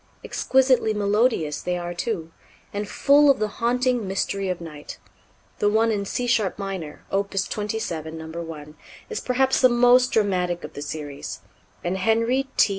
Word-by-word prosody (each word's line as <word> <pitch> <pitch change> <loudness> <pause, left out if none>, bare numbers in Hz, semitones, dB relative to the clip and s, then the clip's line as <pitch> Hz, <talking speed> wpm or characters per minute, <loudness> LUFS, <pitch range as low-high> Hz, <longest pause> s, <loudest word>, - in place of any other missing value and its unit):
Exquisitely 260 -4 +2
melodious 205 - +1
they 180 0 -1
are, 175 0 -4
too, 175 -3 -3 0.4
and 205 0 -3
full 290 +1 +5
of 275 - +5
the 215 - 0
haunting 245 -2 +1
mystery 195 0 -1
of 180 - -2
night. 150 -3 -9 0.6
The 205 - +3
one 225 +2 +3
in 200 -2 -1
C 245 +5 -2
sharp 220 -6 +1
minor, 190 -6 -6
Opus 195 0 0
27, 175 -7 -4
No. 160 - -7 0.2
1, 150 -2 -8 0.4
is 445 - -2
perhaps 260 +1 +1
the 255 - +7
most 245 +1 +5
dramatic 180 -5 +1
of - - -8
the 145 - -7
series, 145 -1 -6 0.4
and 180 +2 -1
Henry 230 +6 +2
T. - - +5
205 Hz, 160 wpm, -24 LUFS, 175-240 Hz, 0.6 s, the